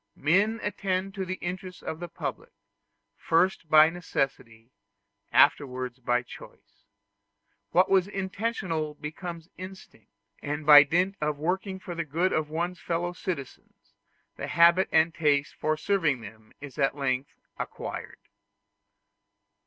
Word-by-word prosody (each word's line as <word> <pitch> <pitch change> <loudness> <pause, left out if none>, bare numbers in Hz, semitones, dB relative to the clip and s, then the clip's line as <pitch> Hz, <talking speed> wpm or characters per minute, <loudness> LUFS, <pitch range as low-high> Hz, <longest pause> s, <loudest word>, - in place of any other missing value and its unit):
Men 200 +9 +2
attend 195 -1 -2
to 195 -2 -4
the 185 +1 -3
interests 185 0 -6
of 160 - -5
the 175 - -5
public, 470 - -6 0.7
first 170 -1 +1
by 155 +1 +7
necessity, 130 -8 -4 0.6
afterwards 130 -2 +2
by 125 0 0
choice: - - -15 0.8
what 180 +2 +4
was 190 -1 +3
intentional 190 -6 -3
becomes 165 +2 -7
an - - -34
instinct; 185 - -11 0.3
and 150 +1 -4
by 145 -1 +11
dint 180 +7 +1
of 150 -1 -1
working 190 +5 -2
for 185 -1 -7
the 165 0 -2
good 165 +5 0
of 155 -1 0
one's 175 +3 -3
fellow 175 +1 -2
citizens, 175 -8 -7 0.4
the - - -5
habit 170 +2 +5
and 160 +1 +4
the - - -19
taste 145 -1 +2
for 155 0 -1
serving 160 -8 +1
them 110 0 -12
is 145 0 -10
at 135 0 +2
length 135 -1 -2 0.2
acquired. - - -6
165 Hz, 135 wpm, -27 LUFS, 145-185 Hz, 0.8 s, by